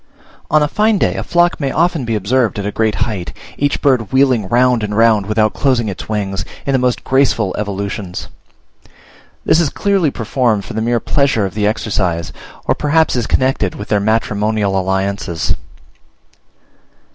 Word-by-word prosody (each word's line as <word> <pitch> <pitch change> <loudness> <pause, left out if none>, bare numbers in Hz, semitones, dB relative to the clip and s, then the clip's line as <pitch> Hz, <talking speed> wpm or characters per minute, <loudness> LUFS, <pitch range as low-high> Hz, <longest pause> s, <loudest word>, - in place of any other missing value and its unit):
On 155 0 +4
a - - +2
fine 215 +6 +2
day - - +1
a - - -4
flock 175 0 +2
may 140 -3 -1
often 165 -4 +1
be 115 -1 -1
observed 110 +3 0
at 100 - -3
a 105 - -2
great 110 0 0
height, 100 -7 -5 0.2
each 145 0 -1
bird 125 -7 +2
wheeling 130 -6 +3
round 125 +1 +3
and 105 -1 -3
round 110 -3 +3
without 110 0 +1
closing 125 -6 +1
its 95 - -7
wings, 95 -3 -2 0.2
in 140 - 0
the 135 - +3
most 125 -1 0
graceful 130 -7 +1
evolutions. 100 -2 -4 1.2
This 160 - +4
is 165 -4 +2
clearly 195 -4 +1
performed 115 -4 -1
for - - -8
the 110 - -2
mere 120 +1 +1
pleasure 135 -5 +1
of 95 - -5
the 105 -1 0
exercise, 95 -6 -1 0.3
or - - +2
perhaps 155 +1 +1
is 120 -3 -1
connected 130 -8 +1
with 105 - -8
their 105 - +2
matrimonial 105 -1 0
alliances. 95 -2 -1
110 Hz, 170 wpm, -16 LUFS, 100-135 Hz, 1.2 s, On